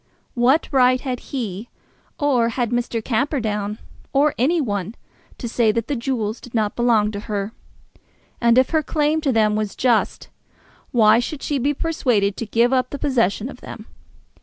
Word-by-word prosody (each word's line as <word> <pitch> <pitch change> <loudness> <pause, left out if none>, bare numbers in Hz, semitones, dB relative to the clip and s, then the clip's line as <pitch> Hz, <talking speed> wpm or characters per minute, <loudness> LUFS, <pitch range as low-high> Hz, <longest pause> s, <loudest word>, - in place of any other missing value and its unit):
What 255 +6 +3
right 255 -2 +4
had 250 -2 -4
he, 225 -4 -4 0.5
or 255 -6 +2
had 240 -1 -2
Mr. 240 -2 -2
Camperdown, 220 -5 -1 0.4
or 285 +2 +3
any 310 +9 +2
one, 205 - -3 0.4
to 240 - -5
say 230 -1 +2
that 230 +2 -2
the 285 - -1
jewels 230 -3 -2
did 245 - -11
not 215 -2 0
belong 225 -3 +2
to 205 - -5
her? 205 -1 -4 0.9
And 235 0 +4
if 260 0 +4
her 315 -1 +2
claim 305 +1 0
to 285 -3 +1
them 215 -3 +2
was 215 -1 -2
just, 240 -4 0 0.6
why 220 -2 +5
should 275 +4 -4
she 290 -2 -1
be 285 +3 0
persuaded 240 -11 0
to 230 - -4
give 235 +4 +2
up 255 -1 +1
the 285 - -5
possession 240 -6 0
of 255 -2 -11
them? 215 - -9
240 Hz, 170 wpm, -21 LUFS, 215-270 Hz, 0.9 s, why